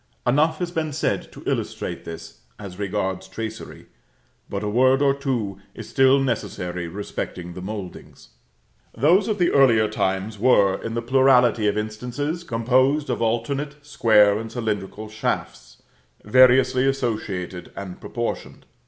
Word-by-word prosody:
Enough 155 +5 +2
has 175 0 -3
been 160 -3 -2
said 155 - -2
to - - -12
illustrate - - -3
this, 85 -1 -9 0.2
as 100 -3 -9
regards 95 -2 -2
tracery; 110 +3 -7 0.6
but 100 +1 -4
a - - -2
word 130 +5 +3
or 140 -1 +3
two 120 -9 -3 0.2
is - - -8
still 135 +1 +4
necessary 90 -8 -3
respecting 90 -1 -6
the 90 - -8
mouldings. 95 -1 -8 0.7
Those 170 - +4
of 215 -2 -1
the 175 -2 +2
earlier 115 -6 +5
times 100 0 -2
were, 100 -5 +3
in 115 0 -5
the 115 - -2
plurality 125 -3 +4
of 105 - 0
instances, 125 +10 -3
composed 130 +3 +1
of 120 - -3
alternate 135 +6 -1
square 105 -7 +4
and 115 0 -7
cylindrical 110 -2 -4
shafts, 65 - -4 0.4
variously 130 +3 +5
associated 105 -9 -3
and 95 -2 -8
proportioned. 120 -1 -5
115 Hz, 135 wpm, -23 LUFS, 100-135 Hz, 0.7 s, earlier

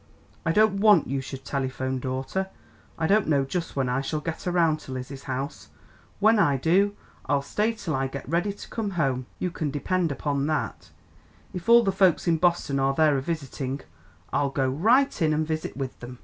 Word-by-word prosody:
I - - +4
don't 210 +2 +3
want 205 -6 +6
you 135 +1 -1
should 135 0 -8
telephone, 130 -1 -2
daughter. 130 +9 -2 0.5
I 160 - 0
don't 205 +5 +3
know 140 -3 +2
just 165 +5 -4
when 135 -2 0
I 125 +2 0
shall 150 +3 -2
get 165 +3 -5
around 165 -3 +2
to 135 - -10
Lizzie's 130 +1 -6
house; 135 +1 -4 0.5
when 220 +1 +5
I 140 -8 +3
do, 190 +8 +2 0.3
I'll 140 0 +1
stay 210 +10 0
till 195 -8 -4
I 135 -1 0
get 140 0 -7
ready 175 +7 0
to 200 - -10
come 220 -3 -2
home, 130 -5 0
you 180 - -2
can 155 -3 -2
depend 165 +4 0
upon 140 0 -1
that, 150 -6 -2 0.6
if 180 +4 -5
all 235 0 +8
the 195 - +2
folks 190 -3 +3
in 165 -1 +3
Boston 170 -5 +1
are 135 0 +1
there 155 -1 +4
a 135 - 0
visiting. 140 -3 -4 0.5
I'll 140 - +2
go 135 -1 0
right 220 - +3
in 155 -1 +3
and 155 +1 0
visit 155 -2 -4
with 135 -2 -5
them. 125 +1 -9
155 Hz, 200 wpm, -26 LUFS, 135-180 Hz, 0.6 s, all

